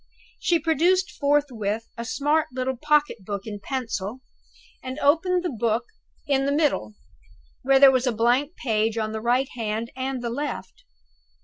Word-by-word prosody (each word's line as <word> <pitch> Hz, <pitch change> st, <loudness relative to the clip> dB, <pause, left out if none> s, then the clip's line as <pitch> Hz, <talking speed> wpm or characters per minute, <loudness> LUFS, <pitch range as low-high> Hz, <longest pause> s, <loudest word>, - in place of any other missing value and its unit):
She 345 Hz, -, +2 dB
produced 330 Hz, +3 st, +2 dB
forthwith 260 Hz, -8 st, 0 dB
a 235 Hz, -, -5 dB
smart 295 Hz, +5 st, +1 dB
little 260 Hz, +1 st, -2 dB
pocket 295 Hz, -4 st, +1 dB
book 200 Hz, 0 st, -5 dB
and 205 Hz, -2 st, -7 dB
pencil, 235 Hz, -2 st, -4 dB, 0.6 s
and 260 Hz, +1 st, -6 dB
opened 355 Hz, +5 st, +2 dB
the 355 Hz, -, -2 dB
book 230 Hz, 0 st, 0 dB, 0.4 s
in 275 Hz, -2 st, +1 dB
the -, -, +1 dB
middle, 285 Hz, -, 0 dB, 0.7 s
where 270 Hz, +1 st, +4 dB
there 275 Hz, -1 st, +9 dB
was 255 Hz, 0 st, +1 dB
a -, -, +3 dB
blank 245 Hz, +8 st, +1 dB
page 220 Hz, -2 st, 0 dB
on 215 Hz, -1 st, -1 dB
the 220 Hz, 0 st, -4 dB
right 250 Hz, +3 st, +1 dB
hand 225 Hz, 0 st, -3 dB
and 260 Hz, -1 st, -3 dB
the 235 Hz, -, -2 dB
left. 235 Hz, -9 st, -5 dB
255 Hz, 155 wpm, -24 LUFS, 225-290 Hz, 0.7 s, there